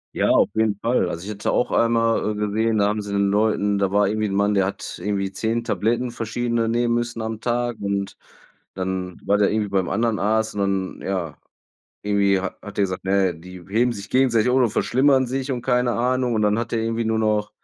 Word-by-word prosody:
Ja, - - +1
auf - - +4
jeden 110 -2 +2
Fall. 120 +3 +1
Also, 85 +2 -6
ich 105 - -5
hatte 105 0 -2
auch - - +1
einmal, 115 -2 +2
äh, - - -4
gesehen, 110 +2 0
da 100 - +3
haben 105 +1 -1
sie 100 0 -7
den 100 0 +2
Leuten 105 -1 +1
da 100 -1 0
war 100 0 +3
irgendwie 110 +1 -1
'n 95 - -4
Mann, 100 +1 +2
der 95 -2 +2
hat 100 - -5
irgendwie 100 0 -2
10 115 +3 -1
Tabletten 120 +3 0
verschiedene 115 0 -1
nehmen 120 +1 +1
müssen 120 -1 -2
am 110 0 -4
Tag. 120 0 -1
Und 100 -1 -2 0.6
dann 95 -1 -4
war 100 - +3
der 105 -1 +3
irgendwie 105 -1 -1
beim 95 -3 0
anderen 115 0 0
Arzt. 110 +1 0
Und 100 - -1
dann, 95 -1 -2
ja 90 -6 -3 0.7
irgendwie 100 -1 +2
ha 95 - -4
hat 105 -1 -10
der 100 - +3
gesagt: 95 -2 -3
„Na 95 0 +2
ja, 90 - -2
die 90 +2 -12
heben 120 +4 +2
sich 100 -3 -9
gegenseitig 125 -3 +3
um 130 +1 +3
und 115 - +2
verschlimmern 130 +3 +3
sich“ 135 +2 -3
und 125 -2 -3
keine 125 -1 +1
Ahnung. 125 +1 0
Und 110 - +1
dann 105 +1 +2
hat 120 - -4
der 115 - +1
irgendwie 115 0 -1
nur 110 0 0
noch 105 -1 0
105 Hz, 230 wpm, -22 LUFS, 100-115 Hz, 0.7 s, auf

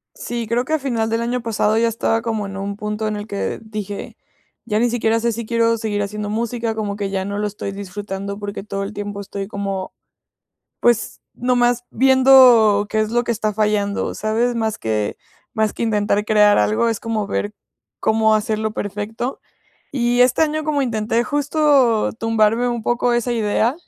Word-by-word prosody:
Sí, 240 - -4
creo 235 +3 0
que 310 - -3
a 315 - +2
final 235 -5 -1
del 225 +1 0
año 245 +1 -1
pasado 220 -1 +1
ya 230 +1 +3
estaba 225 0 0
como 220 -2 -2
en 195 0 -7
un 200 +1 -4
punto 210 +1 -3
en 215 - -2
el 205 - -6
que 200 -2 -3
dije: 210 -2 -6 0.5
"Ya 210 0 0
ni 240 +1 +2
siquiera 230 -1 +1
sé 235 +1 0
si 230 +1 -5
quiero 230 0 +2
seguir 215 -2 -2
haciendo 205 +1 -4
música, 230 +1 -2
como 210 -2 -3
que 200 -1 -3
ya 195 -1 -2
no 200 +1 -4
lo 210 - -1
estoy 205 -1 -5
disfrutando 200 0 -6
porque 205 -1 -5
todo 200 -1 -4
el 200 +2 -6
tiempo 205 -1 -5
estoy 195 0 -6
como, 195 -2 -4 0.9
pues, 240 -2 +1
nomás 245 -1 +1
viendo 255 -6 +6
qué 220 - 0
es 215 0 0
lo 240 +1 +1
que 235 - 0
está 215 -1 -1
fallando, 210 -1 0
¿sabes?". 225 +3 0
Más 220 -2 -1
que 105 -2 -2 0.4
más 220 -2 0
que - - -5
intentar 210 -1 +1
crear 210 -1 +5
algo, 230 +2 +2
es 225 -2 -1
como 220 -3 -2
ver 205 0 -2 0.5
cómo 220 0 +3
hacerlo 215 0 -1
perfecto. 215 +5 -4 0.5
Y 245 -2 +1
este 250 +5 +4
año, 310 0 0
como 295 -2 +1
intenté 230 -1 0
justo 290 -5 +2
tumbarme 225 +2 +2
un 240 -2 -2
poco 240 +1 +1
esa 240 +1 0
idea, 225 +2 +1
220 Hz, 185 wpm, -20 LUFS, 205-240 Hz, 0.9 s, viendo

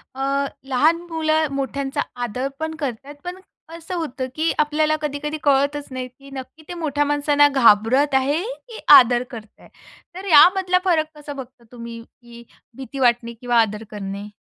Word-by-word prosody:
अ, 275 +1 0 0.2
लहान 300 +6 +3
मुलं 315 -1 +1
मोठ्यांचा 275 0 -2 0.2
आदरप 270 +6 -4
ण 320 0 -3
करतात 275 +1 -5
पण 360 +1 -6 0.4
असं 340 +2 -7
होतं, 265 -6 -4
की 320 +1 +1
आपल्याला 305 +1 +2
कधी-कधी 300 +1 -3
कळतच 285 +1 +1
नाही, 255 -1 -5
की 275 +2 -17
नक्की 265 +4 -9
ते 355 - -6
मोठ्या 295 -4 -1
माणसांना 290 0 +3
घाबरत 260 +2 +4
आहे, 285 +5 +1 0.3
की 455 - -9 0.2
आदर 245 0 +6
करताय. 220 -3 -12 0.5
तर 380 - -8
यामधला 365 +4 +6
फरक 315 -3 0
कसा 295 0 -8
बघता 255 -3 -11
तुम्ही, 235 -1 -9
की 235 0 -16 0.3
भीती 270 +1 -8
वाटणे 235 -1 +2
किंवा 240 0 0
आदर 210 0 -2
करणे? 200 0 -6
275 Hz, 155 wpm, -21 LUFS, 245-310 Hz, 0.5 s, आदर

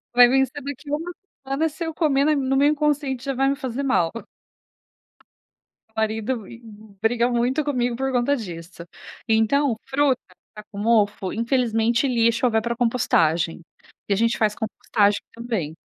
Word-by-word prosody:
Vai 245 0 +9
vencer 265 +2 +1
daqui 285 +1 -7
a 295 - +2
1 335 +3 -5 0.3
semana 285 +4 0
se 335 +3 -7
eu 325 - -4
comer, 285 -4 +2
na 305 0 +3
no 270 -1 0
meu 285 - +4
inconsciente 290 -3 0
já 275 - -1
vai 270 +1 +1
me 275 - +1
fazer 270 -1 -4
mal. 175 -12 +1 1.9
Meu 220 - +1
marido 220 0 -2
m 235 - -12 0.4
briga 235 +2 +2
muito 250 +5 0
comigo 245 -4 -1
por 270 +1 -2
conta 250 +3 +2
disso. 170 -5 -8 0.4
Então, 225 +4 +2
fruta 270 -1 +1 0.3
tá 210 - -9
com 200 - -8
mofo, 205 -3 +1
infelizmente 230 0 +1
lixo 230 0 +2
ou 240 - +1
vai 220 - +3
pra 235 0 -2
compostagem. 175 -10 +1 0.5
E - - +1
a - - +3
gente 230 +3 +1
faz 215 -1 +2
compostagem 210 -2 0
também. 220 -10 -3
240 Hz, 165 wpm, -23 LUFS, 220-275 Hz, 1.9 s, Vai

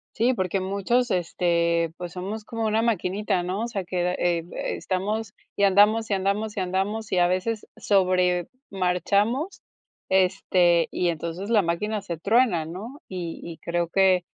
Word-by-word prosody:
Sí, 240 +4 +3
porque 190 -3 -1
muchos 200 +6 0
este 170 -2 +1
pues 175 -1 -6
somos 200 +4 -5
como 225 +1 -4
una 220 +1 +2
maquinita, 200 -4 0
¿no? 185 +4 -2
O - - -1
sea 200 -5 -3
que, 180 0 -1
eh 175 -1 +1
eh, - - -7 0.3
estamos 205 +3 -2 0.2
y 200 - 0
andamos 210 +3 +4
y - - +1
andamos 200 +3 -1
y - - +1
andamos 195 +4 -2
y 185 - +2
a 175 - +5
veces 195 +5 -1
sobre 180 -3 +2 0.2
marchamos 200 - 0 0.5
este 180 -2 +3
y 180 - 0
entonces 170 +4 -4
la 220 -3 +5
máquina 205 +5 -1
se 170 -4 -5
truena, 200 -2 +2
¿no? 215 - -8
Y 175 -3 -5
y 170 -1 -7
creo 170 0 -1
que 185 -1 +3
190 Hz, 165 wpm, -25 LUFS, 175-215 Hz, 0.5 s, a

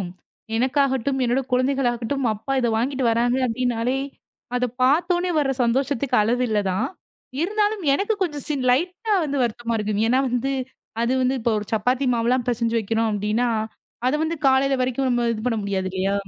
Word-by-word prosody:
வந்துரும். 180 -2 -4 0.5
எனக்காகட்டும், 265 +1 +1
என்னோட 245 +2 +1
குழந்தைகள் 255 +1 +2
ஆகட்டும், 250 +3 -3
அப்பா 220 +6 -5
இத 240 - +1
வாங்கிட்டு 260 +3 -1
வராங்க 240 +2 +2
அப்படின்னாலே 245 +1 -1 0.6
அதைப் 250 -1 -2
பாத்த 285 +7 +3
உடனே 355 +1 -1
வர்ற 275 -2 +1
சந்தோஷத்துக்கு 270 +2 0
அளவு 240 +4 +1
இல்ல 215 - +1
தான். 215 +8 0 0.5
இருந்தாலும் 415 +3 0
எனக்குக் 405 +7 0
கொஞ்சம் 295 -6 -3
சின் 280 -4 -1
லைட்டா 360 - 0
வந்து 285 -1 -2
வருத்தமா 235 0 -2
இருக்கும். 210 -1 -1
ஏன்னா 255 +3 +3 0.8
அது 235 +2 +1
வந்து 255 +1 +2
இப்போ 230 0 +1 0.2
சப்பாத்தி 250 +5 +1
மாவு 230 -1 0
எல்லாம் 250 -1 +1
பிசைஞ்சு 230 -1 0
வைக்கணும் 225 +1 0
அப்படின்னா, 210 +3 0 0.6
அத 255 - +3
வந்து 325 +1 -1
காலைல 270 +1 +4
வரைக்கும் 255 -1 0
இது 215 -1 -5
பண்ண 230 -2 +1
முடியாது 195 -2 -2
இல்லையா? 190 +1 -1
250 Hz, 160 wpm, -23 LUFS, 230-275 Hz, 0.8 s, காலைல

